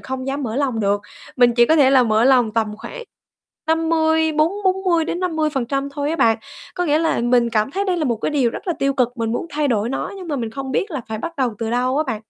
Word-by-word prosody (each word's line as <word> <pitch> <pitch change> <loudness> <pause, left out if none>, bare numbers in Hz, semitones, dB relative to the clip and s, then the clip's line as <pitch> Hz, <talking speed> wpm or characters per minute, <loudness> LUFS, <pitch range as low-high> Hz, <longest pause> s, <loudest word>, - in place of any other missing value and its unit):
không 260 0 -5
dám 275 +1 -2
mở 230 0 -3
lòng 260 -5 0
được, 200 0 +1 0.4
mình 245 -1 +4
chỉ 240 0 +5
có 320 - +4
thể 275 -4 +5
là 265 -2 +5
mở 220 0 +2
lòng 250 -4 +4
tầm 225 0 +1
khoảng - - -8 0.6
50, 320 0 +2
bốn 310 +3 +2
bốn 380 0 +1
mươi 340 -3 +2
đến 345 +2 -3
50% 290 -6 -1
thôi 290 +1 -2
á 330 - -1
bạn. 225 -6 +3 0.4
Có 355 - -1
nghĩa 300 0 +3
là 325 -6 0
mình 240 0 +2
cảm 215 +2 0
thấy 395 +4 -2
đây 370 -3 0
là 315 - -1
một 240 -5 0
cái 220 - -2
điều 270 -6 +1
rất - - -8
là - - +2
tiêu 275 0 +1
cực, 250 -3 +2
mình 225 -1 -2
muốn 290 - -3
thay 295 0 0
đổi 225 -2 0
nó 270 - -3
nhưng 365 -3 -9
mà 290 - -1
mình 230 -4 -3
không 270 +2 -6
biết 395 - -1
là 295 -5 -3
phải 220 0 -4
bắt 335 +9 -6
đầu 255 -5 0
từ 225 -1 -3
đâu 255 +3 0
á 310 - +1
bạn. 220 -4 -3
270 Hz, 275 wpm, -20 LUFS, 235-320 Hz, 0.6 s, chỉ